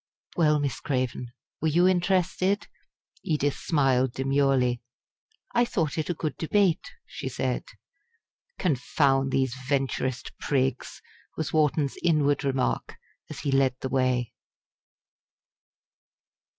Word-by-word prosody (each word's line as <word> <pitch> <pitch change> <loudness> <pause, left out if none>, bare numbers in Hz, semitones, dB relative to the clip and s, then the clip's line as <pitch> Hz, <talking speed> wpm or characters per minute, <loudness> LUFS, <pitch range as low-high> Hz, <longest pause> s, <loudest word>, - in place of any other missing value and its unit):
Well, 150 -3 +3
Miss 140 -2 -2
Craven, 125 -3 -2 0.3
were 160 - +1
you 175 +4 +4
interested?" 185 +2 +1 0.6
Edith 145 -3 0
smiled 130 -5 +2
demurely. 135 -2 +1 0.7
"I 240 - +4
thought 165 -10 -1
it 155 +1 -2
a 175 - 0
good 155 -2 -3
debate," 180 0 +1 0.2
she - - -6
said. - - -2 0.9
"Confound 135 -3 +1
these 130 -2 +1 0.2
Venturist 130 -2 -1
prigs!" 130 -3 -1 0.3
was 160 - -3
Wharton's 150 -2 +1
inward 145 -4 +2
remark 135 -2 -1 0.3
as - - -7
he 140 - -1
led 135 -1 +3
the 130 - -3
way. 130 -2 0
140 Hz, 110 wpm, -27 LUFS, 130-160 Hz, 0.9 s, you